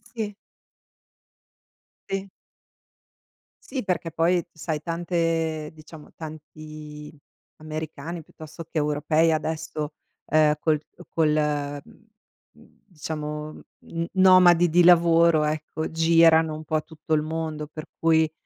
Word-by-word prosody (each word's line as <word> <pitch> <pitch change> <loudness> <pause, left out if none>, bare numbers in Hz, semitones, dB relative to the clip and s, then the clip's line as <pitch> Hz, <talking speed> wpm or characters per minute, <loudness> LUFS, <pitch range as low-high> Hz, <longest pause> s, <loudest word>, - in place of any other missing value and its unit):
Sì. 210 -3 -3 1.7
Sì. 195 0 -3 1.4
Sì, 260 -5 -3
perché, 175 -3 -2
poi, 170 +2 +1
sai, 160 -1 -3
tante 165 -2 -1
diciamo, 155 0 -14
tanti 155 -1 -10 0.4
americani 155 +1 -6
piuttosto 155 +2 -11
che 165 - -6
europei 155 +2 +2
adesso, 155 -1 -3 0.3
ehm, 155 -1 +4
col 155 -2 +1 0.3
col 150 -2 0
mhmm, 220 0 -21 0.8
diciamo, 150 -3 -6 0.3
n 165 0 -3
nomadi 180 -2 +6
di 175 +2 +4
lavoro, 170 -2 +5
ecco, 155 +1 -3
girano 165 -1 +4
un 155 +1 -7
po' 155 0 -1
tutto 160 -1 -5
il 150 - +1
mondo, 155 -1 -4
per 155 +1 -9
cui, 160 -1 +3
160 Hz, 105 wpm, -25 LUFS, 155-165 Hz, 1.7 s, nomadi